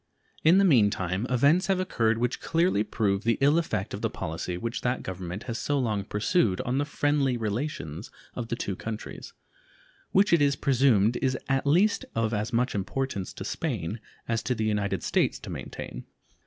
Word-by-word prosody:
In 165 +4 +6
the 195 - +5
mean 120 - +5
time 95 +4 -2
events 145 +9 +3
have 190 -2 +2
occurred 115 -11 +1
which 125 +1 -1
clearly 165 - +2
prove 105 -1 0
the 115 0 +2
ill 145 +4 +4
effect 110 - -3
of 100 - -5
the 115 - 0
policy 90 -2 -4
which 115 +5 -3
that 125 +1 -1
Government 95 +2 -5
has 115 -2 -4
so 145 - 0
long 110 -6 -1
pursued 105 - +1
on 125 +3 -1
the 145 - +1
friendly 145 -3 +1
relations 110 - -4 0.2
of 120 -2 -5
the 115 - -2
two 100 -5 -3
countries, 110 +2 -7 0.8
which 195 -1 +4
it 170 - +5
is 140 -1 +3
presumed 125 -5 +3
is 130 -1 0
at 135 +1 0
least 185 +9 +3
of 115 0 0
as 105 +3 -1
much 125 +2 +1
importance 100 0 -3
to - - -7
Spain 115 - -3 0.3
as 115 -1 0
to 125 - -1
the 110 -1 -1
United 100 -3 -1
States - - +1
to - - -9
maintain. - - -7
115 Hz, 185 wpm, -27 LUFS, 105-140 Hz, 0.8 s, In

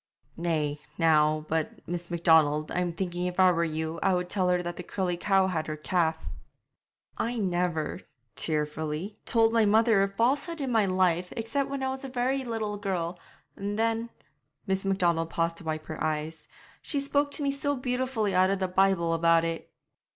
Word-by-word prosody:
'Nay, 155 -3 -1 0.2
now, 155 -2 +3
but, 160 0 -3
Miss 175 0 -4
Macdonald, 160 -3 +3
I'm 180 -1 0
thinking 175 +1 -3
if 180 +1 -5
I 185 -1 +7
were 170 -1 +1
you 160 0 -3
I 190 - +3
would 180 0 -2
tell 185 -3 +2
her 180 0 +1
that 175 0 -4
the - - -6
curly 180 0 -2
cow 195 +2 +2
had 170 -4 -2
her 155 -1 -4
calf.' 160 - 0 0.9
'I 235 +1 -1
never' 175 -5 -1 0.4
tearfully 155 +4 -2
'told 225 -1 +3
my 230 -1 +4
mother 220 0 +4
a 195 - +3
falsehood 275 - 0
in 270 -3 -2
my 220 -4 +3
life, 180 -1 +1
except 270 +5 -1
when 275 -1 -3
I 265 - 0
was 265 +1 -5
a - - -4
very 260 +2 0
little 220 -4 -3
girl, 180 -4 -3 0.4
and 205 +1 -4
then' 225 +1 0 0.6
Miss 190 -1 -1
Macdonald 175 -4 +1
paused 165 0 -1
to 165 - -9
wipe 155 0 -3
her 155 - -5
eyes 155 +1 -3 0.3
'she 285 - -2
spoke 285 +1 +1
to 295 - +2
me 280 - +1
so 285 +1 -1
beautifully 250 -5 -1
out 185 +1 +4
of 195 - +1
the 190 0 -1
Bible 185 -2 +2
about 165 0 +4
it.' 165 0 -4
180 Hz, 185 wpm, -28 LUFS, 165-225 Hz, 0.9 s, I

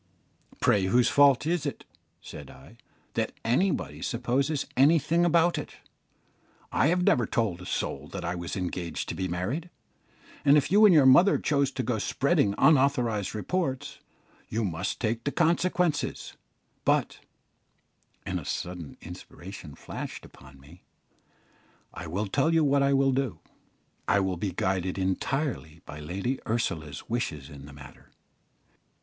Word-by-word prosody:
"Pray, 100 -3 +3
whose 120 +6 +3
fault 140 -2 +5
is 170 -1 0
it," 145 - -5 0.4
said - - -10
I, 65 +1 -15 0.4
"that - - -1
anybody 115 - 0
supposes 135 - -1
anything 155 +4 +4
about 175 0 +3
it? - - -8 1.0
I - - +3
have 180 +2 +2
never 120 -9 +3
told 100 -7 -1
a 90 - -9
soul - - -3
that - - -6
I 85 - -1
was 85 -1 -5
engaged 90 -3 -4
to - - -2
be 95 +2 -2
married, 105 - -3 0.7
and 145 +1 +6
if 150 - 0
you 210 +2 +7
and - - +6
your 145 -4 +6
mother 140 +10 +6
choose 140 -2 +1
to - - -2
go 115 -2 -1
spreading 140 - +1
unauthorised 125 -9 +2
reports, 145 - -2 0.5
you 110 0 -1
must 85 0 -3
take 115 0 -1
the 140 - -1
consequences; 170 -1 0 0.5
but" - - +1 1.1
and - - -2
a - - -9
sudden 90 -4 -5
inspiration 90 -2 -10
flashed - - -7
upon 70 0 -16
me 75 +7 -17 1.1
"I 85 - -7
will 95 +7 -2
tell 135 +10 +1
you 165 -1 +3
what 140 -1 +3
I 140 0 +3
will 135 0 +3
do, 130 -9 -1 0.7
I 100 - +3
will 95 -2 -1
be 95 +2 -2
guided 95 +1 -1
entirely 95 - -2
by 75 - -9
Lady 100 - -3
Ursula's 80 - -3
wishes 75 - -3
in 70 -1 -11
the - - -11
matter. 70 -2 -14
115 Hz, 145 wpm, -27 LUFS, 90-145 Hz, 1.1 s, you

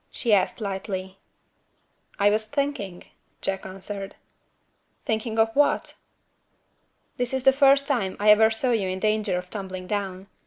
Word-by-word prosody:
she 230 -4 0
asked 195 +2 +2
lightly. 190 -2 -5 1.0
"I 205 +1 +4
was 215 +1 0
thinking," 220 -9 -3 0.4
Jack 195 0 -2
answered. 195 +1 -7 0.9
"Thinking 220 0 -2
of 225 0 +2
what?" 290 +1 +2 1.2
"This 245 +1 -1
is 260 - -2
the 270 - +6
first 275 0 +5
time 230 -10 -1
I 210 +1 +6
ever 220 +1 +6
saw 225 +3 0
you 215 -5 +1
in 185 - -2
danger 215 -2 0
of 180 0 -7
tumbling 190 -3 -6
down. 195 -1 -3
210 Hz, 145 wpm, -25 LUFS, 190-230 Hz, 1.2 s, the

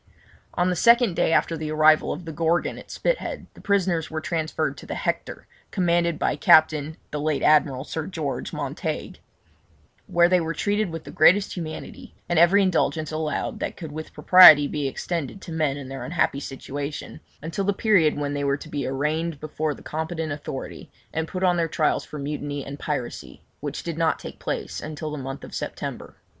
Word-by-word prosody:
On 180 +1 +2
the - - 0
second 235 0 +4
day - - +2
after 165 - +2
the 155 -1 -4
arrival 155 0 +4
of 170 +3 -6
the 165 - -5
Gorgon 165 +2 0
at - - -14
Spithead - - -2
the - - -15
prisoners 185 -5 +1
were 160 - -3
transferred 160 0 -2
to - - -11
the - - -4
Hector, - - -3 0.2
commanded 170 -3 +1
by - - 0
Captain 155 +1 +4
(the 150 - -3
late 155 -1 0
Admiral 145 -4 +3
Sir 160 +1 -5
George) 155 -7 -4
Montague, - - -4 0.9
where 175 -2 +4
they 180 0 +3
were 165 0 -3
treated 205 -1 0
with 165 -1 -6
the - - -10
greatest 195 +6 +4
humanity, 160 -3 -7
and 175 -2 +2
every 190 +4 +6
indulgence 160 -4 0
allowed 155 -1 -2
that - - -4
could 160 -4 -7
with 155 +1 -7
propriety 155 -6 +8
be 145 -2 -2
extended 165 +3 -4
to 170 - -8
men 155 -4 0
in 140 -2 -7
their 135 0 -6
unhappy 165 -4 0
situation, 140 +1 -6 0.2
until 165 +5 -3
the 200 - +3
period 195 -8 +3
when 145 -1 -2
they 145 0 -2
were 140 0 +1
to 155 - -11
be 145 -3 -3
arraigned 150 +3 -1
before 155 0 -3
the - - -15
competent 160 0 -3
authority, 145 -2 -6 0.2
and 160 0 -2
put 185 +2 -4
on 180 -1 +3
their 165 -1 +1
trials 155 -1 +1
for 150 - -9
mutiny 145 -1 -4
and 140 +1 -8
piracy, 145 -6 -5 0.2
which 145 0 -5
did 165 -1 -4
not 165 -1 +2
take - - -10
place - - -4
until 155 0 -5
the 150 - -4
month 135 +1 -6
of - - -10
September. - - -5
155 Hz, 190 wpm, -24 LUFS, 145-170 Hz, 0.9 s, propriety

